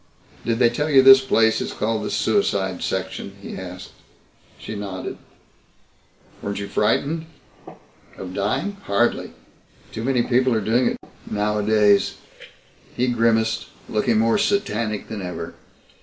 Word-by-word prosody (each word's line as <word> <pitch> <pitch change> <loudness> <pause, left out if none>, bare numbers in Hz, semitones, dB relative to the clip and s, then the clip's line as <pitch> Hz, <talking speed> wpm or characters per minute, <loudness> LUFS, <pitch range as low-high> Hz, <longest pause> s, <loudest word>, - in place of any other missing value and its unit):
"Did 115 -1 0
they 120 -1 +4
tell 150 +6 -1
you 135 -3 +6
this 135 0 +9
place 115 -4 +2
is - - -4
called 110 0 -1
the - - -3
suicide 95 - 0
section?" 100 - -4
he 100 - -8
asked. 90 -1 -8 0.7
She - - -7
nodded. 100 -3 -6 1.2
"Weren't 100 0 -4
you 100 0 -4
frightened?" 150 +12 0 0.9
"Of 90 -1 -7
dying? 135 - -1
Hardly. 120 +4 0 0.6
Too 110 - -5
many 125 -1 +1
people 125 0 +2
are - - +2
doing 115 +4 +2
it - - -1 0.3
nowadays." 105 0 +2 0.8
He 125 +1 +1
grimaced, 115 -1 +1 0.2
looking 110 +1 +1
more 115 +1 +3
satanic 110 - -1
than 110 -2 -6
ever. 90 -2 -6
110 Hz, 130 wpm, -22 LUFS, 100-125 Hz, 1.2 s, this